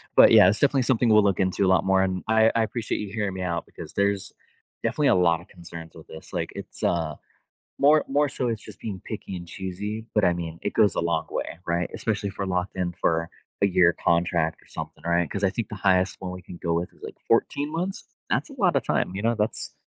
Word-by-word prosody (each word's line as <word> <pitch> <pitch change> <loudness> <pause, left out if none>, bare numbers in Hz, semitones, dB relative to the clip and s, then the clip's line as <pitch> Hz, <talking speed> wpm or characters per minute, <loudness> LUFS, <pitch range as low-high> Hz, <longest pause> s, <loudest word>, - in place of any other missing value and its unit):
but, - - +8
yeah, 90 - +8
it's 105 - 0
definitely 140 -2 +3
something 120 -2 +2
we'll 105 -1 +6
look 100 -2 +1
into 95 +1 +1
a - - +2
lot 95 - +3
more, 95 0 +4
and 95 -1 -2
I 110 0 +5
I 115 - +3
appreciate 110 0 -3
you 105 -2 -5
hearing 105 -3 -1
me 95 - -4
out 85 -2 -2
because - - -10
there's 100 -1 0 0.5
definitely - - +1
a - - +5
lotta 85 -1 +2
concerns 85 -3 -11
with 80 - -12
this, 80 - -12
like, - - -2
it's, - - -9
uh, 80 -4 0 0.6
more 150 +2 +5
more 145 +1 +2
so 125 - -2
it's 110 -2 -3
just - - -11
being 100 -5 -6
picky 105 -3 -6
and 85 - -9
choosy, 100 +5 -5
but, 105 - +4
I 90 - +4
mean, 85 -1 -5
it - - -2
goes 105 - +3
a - - 0
long 85 -1 0
way, 85 - -4
right? 85 0 0
Especially 105 -2 -2
if 95 - -13
we're 100 - 0
locked 90 0 -2
in 90 -1 -1
for 80 0 +1 0.3
a 100 - +6
year 90 -2 +4
contract 85 -1 +1
or - - -24
something, - - -7
right? 85 -2 +1
'Cause 100 - -3
I 95 - +4
think 115 -4 -4
the - - -6
highest 95 -2 +2
one 95 -1 -5
we 90 - -8
can 90 - -10
go 85 -1 +1
with 85 +1 -2
is - - -21
like - - -8
14 145 +1 +1
months? 180 +4 -3 0.3
That's - - 0
a - - -10
lotta 180 - +2
time, - - 0
you 100 - -3
know, 115 +1 +2
that's 105 +1 -2
95 Hz, 245 wpm, -25 LUFS, 85-110 Hz, 0.6 s, but